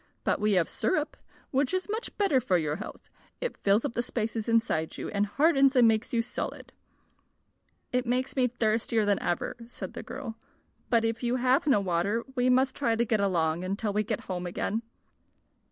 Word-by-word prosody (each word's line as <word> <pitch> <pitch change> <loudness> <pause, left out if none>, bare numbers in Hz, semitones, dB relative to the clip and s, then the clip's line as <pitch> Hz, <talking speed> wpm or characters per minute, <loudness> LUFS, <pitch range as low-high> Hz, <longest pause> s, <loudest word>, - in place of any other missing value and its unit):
But - - +1
we 210 0 +3
have 180 -4 +3
syrup, 310 -5 -1 0.4
which 275 +6 +1
is 370 - -2
much 440 +3 -4
better 350 -11 +3
for 185 -5 +2
your 155 -2 -1
health. 210 - -9 0.3
It - - -3
fills 200 +3 +2
up - - -2
the 240 - 0
spaces 225 -2 -3
inside 225 -9 +1
you, - - -4
and 205 0 0
hardens 275 +2 +4
and 245 -2 +7
makes 220 0 +1
you 230 -1 +1
solid." 245 - -5 1.2
"It 250 0 +1
makes 250 +2 0
me 255 -2 +3
thirstier 225 -2 +1
than 205 -1 +2
ever," 175 -1 -1
said 245 - -7
the - - -6
girl. 225 -5 -7 0.5
"But 230 -1 +3
if 225 0 -1
you 245 0 0
have 255 +3 +2
no 265 -8 +5
water 195 +4 0
we 250 -1 +2
must 260 +1 +3
try 235 -5 +1
to 235 +1 +1
get 220 -1 +1
along 170 -4 +1
until 200 +3 -2
we 210 - +2
get 215 0 -2
home 180 -1 -4
again." 205 +5 -2
230 Hz, 190 wpm, -28 LUFS, 200-255 Hz, 1.2 s, and